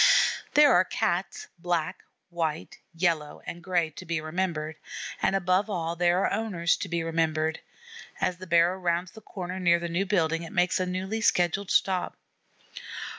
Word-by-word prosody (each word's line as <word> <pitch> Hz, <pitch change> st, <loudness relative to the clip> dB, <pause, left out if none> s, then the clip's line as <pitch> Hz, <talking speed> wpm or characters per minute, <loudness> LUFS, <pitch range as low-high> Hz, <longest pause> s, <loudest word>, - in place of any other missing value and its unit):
There 295 Hz, -3 st, +7 dB
are -, -, +6 dB
Cats 180 Hz, 0 st, -2 dB
black, 175 Hz, 0 st, -1 dB, 0.3 s
white, 160 Hz, -2 st, -3 dB, 0.2 s
yellow, 165 Hz, -4 st, -1 dB
and 170 Hz, -, -6 dB
gray 175 Hz, -3 st, 0 dB
to 170 Hz, -, -10 dB
be 170 Hz, -2 st, -2 dB
remembered, 155 Hz, -1 st, -3 dB, 0.4 s
and, -, -, +2 dB
above 190 Hz, +2 st, +1 dB
all, 170 Hz, -4 st, -2 dB
there 175 Hz, +2 st, +2 dB
are -, -, 0 dB
owners 180 Hz, -6 st, +1 dB
to -, -, -5 dB
be 170 Hz, -1 st, -1 dB
remembered. 160 Hz, -1 st, 0 dB, 0.6 s
As 180 Hz, -1 st, 0 dB
the 185 Hz, +1 st, -10 dB
barrow 170 Hz, +2 st, +3 dB
rounds 175 Hz, 0 st, -1 dB
the 220 Hz, -, -13 dB
corner 185 Hz, -2 st, -6 dB
near 170 Hz, -2 st, +4 dB
the 170 Hz, 0 st, -4 dB
new 180 Hz, +4 st, -1 dB
building 165 Hz, -4 st, +1 dB
it 165 Hz, -, -8 dB
makes 180 Hz, +1 st, +2 dB
a 185 Hz, -, 0 dB
newly 190 Hz, +5 st, -3 dB
scheduled 180 Hz, 0 st, +2 dB
stop. 185 Hz, -2 st, +1 dB
175 Hz, 165 wpm, -27 LUFS, 165-185 Hz, 0.6 s, There